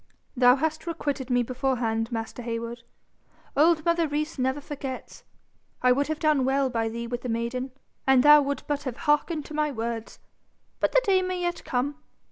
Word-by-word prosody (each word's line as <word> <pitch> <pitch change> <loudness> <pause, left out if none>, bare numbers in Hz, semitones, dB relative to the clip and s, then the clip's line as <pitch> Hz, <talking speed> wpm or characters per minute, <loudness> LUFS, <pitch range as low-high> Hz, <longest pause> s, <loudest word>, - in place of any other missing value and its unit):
'Thou 250 0 +6
hast 315 +3 -2
requited 285 -5 -3
me 245 -1 +3
beforehand, 240 -2 -1
master 225 +1 -4
Heywood. 235 0 -4 0.7
Old 310 +1 +4
mother 335 -1 +2
Rees 300 0 -3
never 260 +2 0
forgets. 275 -2 -7 0.6
I 250 - +6
would 280 +3 +2
have 310 0 -2
done 305 -4 +2
well 265 0 +1
by 225 -2 0
thee 235 +1 -5
with 240 +1 -4
the 250 - -5
maiden, 235 +3 -2 0.4
an' 265 -1 +6
thou 295 +2 +8
would 280 0 -2
but 290 -1 -2
have 260 -3 -5
hearkened 300 +1 +1
to - - -10
my 300 0 +1
words. 230 -3 -4 0.6
But - - +1
the - - +4
day 380 -2 +4
may 365 -1 -2
yet 350 0 -2
come. 265 +3 -1
270 Hz, 180 wpm, -26 LUFS, 245-300 Hz, 0.7 s, thou